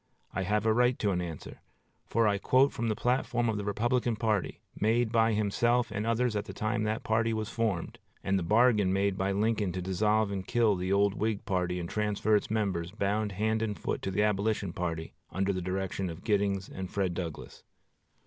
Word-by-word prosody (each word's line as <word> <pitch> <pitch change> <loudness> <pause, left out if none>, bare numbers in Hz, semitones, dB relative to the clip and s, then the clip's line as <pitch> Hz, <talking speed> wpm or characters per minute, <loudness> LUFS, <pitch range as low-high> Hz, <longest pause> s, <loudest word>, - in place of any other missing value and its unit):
I - - -1
have 105 +3 0
a 110 - +4
right 125 +2 +3
to 105 - 0
an 90 -1 0
answer; 85 -3 -7 0.5
for 115 -1 +2
I 100 -1 +1
quote 130 +6 +3
from 115 - -2
the 110 - 0
platform 120 0 0
of 110 - -1
the 105 - -3
Republican 120 +3 0
party, 105 -3 -1 0.2
made 110 +2 +2
by 115 -1 +3
himself 120 +3 +1
and 105 +1 -2
others 115 0 +1
at 105 - -1
the - - -9
time 110 +1 -1
that 110 +1 -2
party 115 +1 +1
was 110 0 -3
formed, 110 -7 -2 0.2
and 95 0 +1
the - - -3
bargain 105 +1 +3
made 100 0 +1
by 95 0 0
Lincoln 105 -1 +1
to 95 - -3
dissolve 105 +3 +1
and 95 -1 -4
kill 115 -4 +3
the 90 +1 -2
old 100 0 +3
Whig 110 0 -2
party 90 -2 -1
and 85 - -4
transfer 105 +2 +1
its 105 - 0
members, 100 -6 -1
bound 105 +1 -1
hand 110 +3 0
and 105 -2 -2
foot, - - -3
to - - -3
the 105 +2 +1
Abolition 105 -2 0
party 85 -2 -4 0.2
under 95 +1 0
the 95 - -3
direction 95 +1 -2
of 85 +2 -8
Giddings 100 -3 0
and 95 -1 -6
Fred 95 -3 -1
Douglass. 85 -4 -6
105 Hz, 205 wpm, -30 LUFS, 95-110 Hz, 0.5 s, a